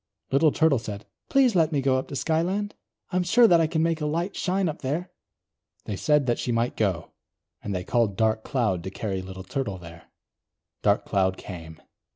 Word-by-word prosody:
Little 150 Hz, +3 st, +4 dB
Turtle 155 Hz, -5 st, +3 dB
said: 105 Hz, -2 st, -7 dB, 0.2 s
"Please 265 Hz, -4 st, +4 dB
let 165 Hz, -2 st, +3 dB
me 145 Hz, -, +1 dB
go 130 Hz, -1 st, +2 dB
up -, -, -6 dB
to 140 Hz, -, -7 dB
Skyland? 170 Hz, -, 0 dB, 0.4 s
I 180 Hz, -, 0 dB
am -, -, +3 dB
sure 225 Hz, +7 st, +5 dB
that 170 Hz, -4 st, +5 dB
I 160 Hz, -, +3 dB
can 160 Hz, 0 st, 0 dB
make 165 Hz, -1 st, 0 dB
a 150 Hz, -, 0 dB
light 170 Hz, +5 st, -2 dB
shine 190 Hz, 0 st, 0 dB
up 155 Hz, -, -4 dB
there." 160 Hz, +7 st, -2 dB, 0.7 s
They 105 Hz, -, -3 dB
said 150 Hz, +6 st, +2 dB
that 120 Hz, -1 st, 0 dB
she 125 Hz, -, -1 dB
might 115 Hz, +1 st, 0 dB
go, 95 Hz, -6 st, -1 dB, 0.5 s
and 100 Hz, -2 st, -4 dB
they 90 Hz, -, -2 dB
called 110 Hz, -2 st, +1 dB
Dark 110 Hz, 0 st, +1 dB
Cloud 105 Hz, -10 st, 0 dB
to -, -, -3 dB
carry 95 Hz, -1 st, -3 dB
Little 95 Hz, 0 st, -8 dB
Turtle 105 Hz, -1 st, -3 dB
there. 85 Hz, -1 st, -12 dB, 0.8 s
Dark -, -, +2 dB
Cloud 95 Hz, -1 st, +1 dB
came. 80 Hz, -3 st, -9 dB
130 Hz, 200 wpm, -26 LUFS, 100-165 Hz, 0.8 s, sure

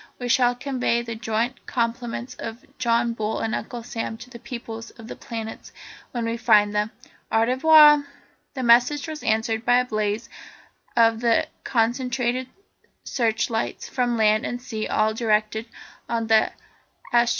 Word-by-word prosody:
We 245 Hz, -1 st, -5 dB
shall 245 Hz, 0 st, +3 dB
convey 250 Hz, -2 st, -1 dB
the 230 Hz, -1 st, -5 dB
joint 225 Hz, +3 st, -2 dB
compliments 235 Hz, 0 st, -2 dB
of 230 Hz, +5 st, -8 dB
John 235 Hz, -1 st, +1 dB
Bull 220 Hz, -1 st, -2 dB
and 225 Hz, -, -2 dB
Uncle 240 Hz, -2 st, -5 dB
Sam 225 Hz, -1 st, -4 dB
to 250 Hz, +2 st, -12 dB
the 235 Hz, -, -10 dB
peoples 230 Hz, -2 st, -7 dB
of 225 Hz, -2 st, -13 dB
the -, -, -7 dB
planets 225 Hz, -3 st, -7 dB, 0.4 s
when 240 Hz, -2 st, -3 dB
we 230 Hz, 0 st, -2 dB
find 210 Hz, -3 st, +4 dB
them. 210 Hz, +1 st, 0 dB, 0.4 s
Au 225 Hz, -, +3 dB
revoir!" 295 Hz, +3 st, +6 dB, 0.5 s
The 260 Hz, -, -3 dB
message 250 Hz, +6 st, +4 dB
was 310 Hz, -1 st, -6 dB
answered 220 Hz, 0 st, 0 dB
by 245 Hz, +1 st, +4 dB
the 250 Hz, -, -14 dB
blaze 215 Hz, +1 st, -1 dB, 0.7 s
of 225 Hz, -1 st, +4 dB
the 235 Hz, -1 st, +2 dB, 0.2 s
concentrated 250 Hz, +1 st, 0 dB, 0.5 s
searchlights 225 Hz, -1 st, -1 dB
from 245 Hz, -2 st, 0 dB
land 215 Hz, -1 st, +3 dB
and 245 Hz, -, -3 dB
sea 220 Hz, -3 st, -5 dB
all 215 Hz, 0 st, +1 dB
directed 220 Hz, 0 st, 0 dB, 0.4 s
on 230 Hz, -1 st, -1 dB
the 220 Hz, -1 st, +3 dB, 0.6 s
Astronef. 235 Hz, 0 st, +4 dB
235 Hz, 150 wpm, -24 LUFS, 225-245 Hz, 0.7 s, revoir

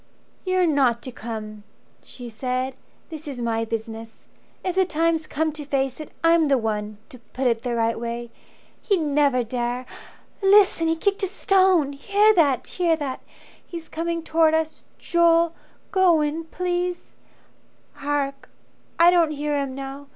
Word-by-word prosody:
"You're 370 Hz, -1 st, +2 dB
not 265 Hz, -7 st, +2 dB
to 255 Hz, -, -6 dB
come," 215 Hz, -3 st, -7 dB, 0.4 s
she 245 Hz, -1 st, -10 dB
said. 255 Hz, +3 st, -3 dB, 0.4 s
"This 315 Hz, -1 st, -8 dB
is 270 Hz, -4 st, -6 dB
my 225 Hz, -1 st, -1 dB
business. 225 Hz, 0 st, -6 dB, 0.4 s
If 370 Hz, -, 0 dB
the 380 Hz, +1 st, +3 dB
time's 330 Hz, -2 st, 0 dB
come 315 Hz, +2 st, -1 dB
to 300 Hz, 0 st, -7 dB
face 270 Hz, -2 st, -1 dB
it, 310 Hz, -, -8 dB
I'm 330 Hz, -1 st, +4 dB
the 275 Hz, -1 st, +3 dB
one 215 Hz, -2 st, -3 dB
To 255 Hz, -, -13 dB
put 260 Hz, +1 st, -2 dB
it 230 Hz, -2 st, +2 dB
the 240 Hz, -1 st, -2 dB
right 230 Hz, 0 st, 0 dB
way. 235 Hz, 0 st, -5 dB, 0.5 s
He'd 395 Hz, -4 st, +1 dB
never 285 Hz, -4 st, +2 dB
dare 245 Hz, +2 st, -3 dB, 0.6 s
Listen! 390 Hz, -4 st, +5 dB
He 325 Hz, -, +2 dB
kicked 395 Hz, +4 st, -1 dB
a 385 Hz, -, +1 dB
stone. 370 Hz, -6 st, +2 dB
Hear 405 Hz, +9 st, +3 dB
that, 280 Hz, -, +2 dB
hear 345 Hz, -3 st, +1 dB
that! 285 Hz, -4 st, -5 dB, 0.4 s
He's 335 Hz, -2 st, -9 dB
coming 335 Hz, 0 st, -3 dB
towards 320 Hz, 0 st, +3 dB
us. 315 Hz, 0 st, -4 dB
Joel, 335 Hz, -1 st, +3 dB, 0.4 s
go 370 Hz, -6 st, +4 dB
in 305 Hz, +2 st, -2 dB
please. 355 Hz, +1 st, -3 dB, 0.8 s
Hark! 280 Hz, -1 st, -3 dB, 0.5 s
I 340 Hz, +1 st, +7 dB
don't 340 Hz, -3 st, +4 dB
hear 295 Hz, 0 st, -2 dB
him 275 Hz, -2 st, -2 dB
now. 275 Hz, +1 st, -7 dB
295 Hz, 155 wpm, -23 LUFS, 250-335 Hz, 0.8 s, I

